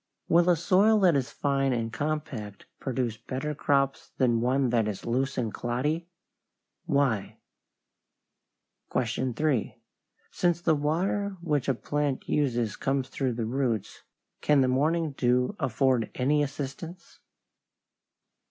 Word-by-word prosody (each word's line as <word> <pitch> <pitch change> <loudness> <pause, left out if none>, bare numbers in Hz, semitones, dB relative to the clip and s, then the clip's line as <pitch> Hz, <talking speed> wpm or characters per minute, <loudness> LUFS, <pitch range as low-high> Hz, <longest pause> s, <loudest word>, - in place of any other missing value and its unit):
Will 175 +1 +4
a 175 - +6
soil 195 +7 +4
that 180 -5 +5
is 135 -2 0
fine 135 -2 0
and 115 -1 -2
compact 135 -8 -4
produce 125 -4 -2
better 135 +6 -4
crops 140 -1 0
than 120 -3 +2
one 130 +1 +2
that 115 -3 +2
is 105 -3 -5
loose 130 +4 -1
and 115 -4 -1
cloddy? 145 +8 -2 0.8
Why? 135 -8 +1 1.6
3. 125 +2 0 0.6
Since 175 -1 +1
the 165 - +3
water 185 +7 0
which 150 -6 -1
a 135 - +2
plant 145 +1 -2
uses 120 -7 0
comes 135 -1 -1
through 130 -2 -1
the 115 -1 -2
roots, 120 -3 -2 0.4
can 150 -2 +4
the 130 - +3
morning 155 +5 +1
dew 125 +5 +1
afford 130 -1 +1
any 145 +4 +2
assistance? 145 +5 -6
135 Hz, 125 wpm, -28 LUFS, 125-150 Hz, 1.6 s, a